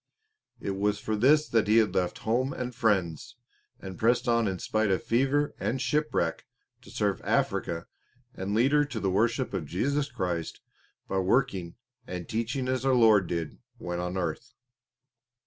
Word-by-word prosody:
It 100 - -3
was 105 +1 +1
for 110 +1 -2
this 150 +7 +4
that 115 -3 +2
he 110 +2 +4
had 110 -4 +3
left 90 -2 0
home 125 +5 +1
and 125 0 -4
friends, 100 - 0 0.4
and 95 -1 -8
pressed 120 +2 +2
on 115 -2 +3
in 95 -1 -2
spite 110 +4 0
of 95 - +1
fever 135 +5 +1
and 130 - -1
shipwreck 150 +4 -1 0.3
to - - -15
serve - - -1
Africa 85 0 0 0.5
and 100 +2 -3
lead 125 +5 +3
her 150 0 +4
to 135 -6 -5
the 95 -2 0
worship 115 +6 +1
of 90 -6 -3
Jesus 140 - -1
Christ 85 -7 -3 0.5
by 95 - -1
working 95 -4 0 0.3
and 90 -1 -6
teaching 120 +4 -2
as 130 -1 -1
our 135 -1 +3
Lord 110 -6 +5
did 85 -2 -4 0.2
when 90 -6 -4
on 90 +1 -3
earth. 90 - -4
110 Hz, 165 wpm, -28 LUFS, 95-130 Hz, 0.5 s, Lord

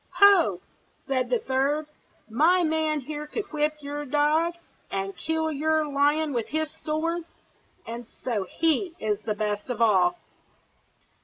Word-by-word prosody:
"Ho!" 360 - +6 0.4
said 255 -2 -1
a 245 - +4
third. 275 +5 0 0.4
"My 320 +11 +4
man 315 -2 +1
here 300 +2 -6
could 405 +2 -5
whip 300 0 +1
your 290 +1 -4
dog, 300 +4 +2 0.3
and 195 0 -3
kill 320 0 -1
your 310 +1 +1
lion 290 +1 +2
with 235 -3 -1
his 315 0 -2
sword, 330 +2 -2 1.0
so 215 -6 -1
he 330 - 0
is 210 -1 -1
the 215 -1 -2
best 210 +1 -2
of 245 -3 -3
all." 230 - +4
295 Hz, 135 wpm, -26 LUFS, 245-315 Hz, 1.0 s, Ho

